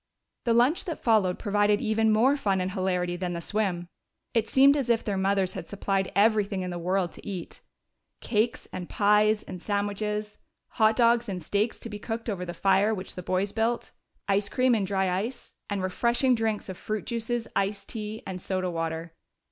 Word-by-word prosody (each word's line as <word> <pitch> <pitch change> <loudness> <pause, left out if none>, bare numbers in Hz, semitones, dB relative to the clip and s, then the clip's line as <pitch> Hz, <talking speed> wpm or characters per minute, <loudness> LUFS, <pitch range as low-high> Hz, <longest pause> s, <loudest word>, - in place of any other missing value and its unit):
The 235 - +3
lunch 255 +11 +3
that 335 -4 -5
followed 210 -6 +3
provided 205 -1 +2
even 220 0 +2
more 240 +6 +4
fun 200 -9 0
and 185 +1 -1
hilarity 180 -2 -1
than 175 0 -3
the 170 - -3
swim. 180 -2 -2 0.5
It 225 -1 +1
seemed 275 +1 +6
as 270 -4 -1
if 230 -1 +3
their 205 - -1
mothers 190 -1 +1
had - - -6
supplied 195 -1 -1
everything 205 -2 +3
in 180 - -4
the 175 - -4
world 180 0 0
to - - -13
eat. 185 -4 -6 0.6
Cakes 225 +1 0
and 180 -1 -6
pies 210 +1 +3
and 180 - -8
sandwiches; 210 +1 -2 0.3
hot 220 -1 +3
dogs 235 -1 +3
and 180 -3 -4
steaks 205 +6 0
to - - -5
be 210 -2 -7
cooked 230 +1 -4
over 180 -3 -4
the 175 -1 -6
fire 195 +4 +3
which 185 -1 -6
the 180 - -6
boys 185 +3 0
built; 230 +1 -1 0.4
ice 200 0 +1
cream 255 -1 +3
in 210 -4 +1
dry 190 0 0
ice, 205 +8 -3 0.2
and 200 -2 -2
refreshing 235 +7 +2
drinks 225 -3 -1
of 190 -2 -7
fruit 215 -1 -3
juices, 235 0 -2
iced 200 +1 -1
tea, 215 -1 -5
and 185 -1 -5
soda 185 -1 -2
water. 165 0 -3
205 Hz, 190 wpm, -27 LUFS, 185-225 Hz, 0.6 s, seemed